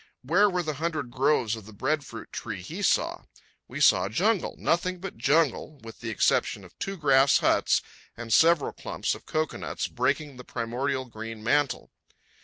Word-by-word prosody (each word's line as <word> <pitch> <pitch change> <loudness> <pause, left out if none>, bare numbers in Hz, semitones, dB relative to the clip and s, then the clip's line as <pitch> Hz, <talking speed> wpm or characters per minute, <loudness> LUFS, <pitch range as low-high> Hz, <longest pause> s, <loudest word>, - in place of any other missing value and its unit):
Where 185 +10 +4
were 180 -2 -1
the 155 -1 -2
hundred 155 -7 -2
groves 130 -3 +2
of 110 -2 -11
the 110 - -12
breadfruit 145 +7 -3
tree - - -5
he - - -6
saw? - - +1 0.4
We - - -7
saw 95 +1 +4
jungle, 195 - +1
nothing 180 +2 0
but 195 +1 -7
jungle, 145 +3 +1
with 115 0 -11
the 115 - -5
exception 110 - +1
of - - -17
two 195 0 -4
grass 140 -3 +5
huts - - +2 0.3
and 115 -1 -3
several 165 0 +4
clumps - - -3
of - - -11
cocoanuts 155 0 -2
breaking 135 +3 -1
the 125 - -9
primordial 130 +3 -2
green 110 -2 -8
mantle. 145 +3 0
140 Hz, 165 wpm, -27 LUFS, 120-160 Hz, 0.4 s, grass